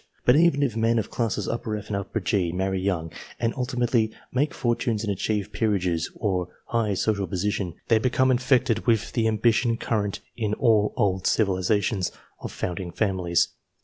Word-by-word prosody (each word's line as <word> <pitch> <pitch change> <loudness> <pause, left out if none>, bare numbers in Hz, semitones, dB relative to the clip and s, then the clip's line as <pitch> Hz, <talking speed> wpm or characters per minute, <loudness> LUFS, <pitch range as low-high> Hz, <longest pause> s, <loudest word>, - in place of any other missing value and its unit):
But 125 - +6
even 155 -3 +4
if 125 -6 0
men 115 +1 +2
of 110 - -2
classes 115 -4 -1
F 115 - -2
and 105 -1 -3
G 90 -5 +1
marry 95 +1 -1
young, 85 -4 -1 0.3
and 115 -1 0
ultimately 125 -3 +1 0.2
make 135 +3 +1
fortunes 120 -3 -1
and 105 -2 0
achieve 105 +1 -2
peerages 90 -7 0
or 95 -5 -1 0.2
high 110 -4 0
social 100 0 0
position, 100 -2 -2
they 115 -1 +4
become 130 +2 +2
infected 125 -2 +2
with 115 -3 +2
the 115 -2 +2
ambition 115 +1 +2
current 105 -3 -1 0.2
in 105 -3 -1
all 110 -4 +3
old 95 -2 +1
civilizations, 100 -1 +1 0.3
of - - -6
founding 90 0 -4
families. 90 -3 +1
105 Hz, 155 wpm, -25 LUFS, 95-115 Hz, 0.3 s, But